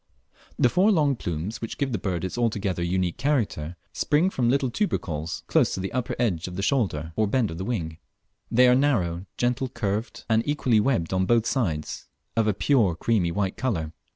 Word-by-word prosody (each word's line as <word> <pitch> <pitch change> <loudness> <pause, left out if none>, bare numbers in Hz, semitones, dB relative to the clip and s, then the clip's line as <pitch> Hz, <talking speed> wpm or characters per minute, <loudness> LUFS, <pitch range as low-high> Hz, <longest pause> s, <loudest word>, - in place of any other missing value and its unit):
The - - +5
four 185 - +3
long 155 -8 +3
white 135 -4 -1
plumes 90 +7 -4
which 115 - -5
give 140 -2 -1
the 110 - -1
bird 90 -4 -2
its 95 - -4
altogether 105 -6 -1
unique 90 0 0
character, 110 - -1 0.2
spring 165 +6 +2
from 120 -7 +1
little 130 -1 +1
tubercles 85 - -2
close - - +2
to - - -4
the 95 +1 -3
upper 125 -1 -2
edge 95 -10 0
of 90 - -7
the 95 - -3
shoulder 90 - 0
or 110 -1 +2
bend 115 -2 +1
of 80 - -7
the 95 - -3
wing; 85 -9 -3 0.5
they 125 +2 +5
are 125 - +6
narrow, 100 -10 +1
gentle 125 +1 0
curved, 110 -1 -3
and 110 -1 +3
equally 130 -6 +2
webbed 105 -8 +1
on 95 0 +1
both 115 -1 +3
sides, 85 - -2 0.3
of 115 -1 +2
a 105 - +3
pure 110 - +3
creamy 90 -2 +1
white 95 +1 -1
colour. 85 -12 -2
110 Hz, 200 wpm, -25 LUFS, 90-125 Hz, 0.5 s, are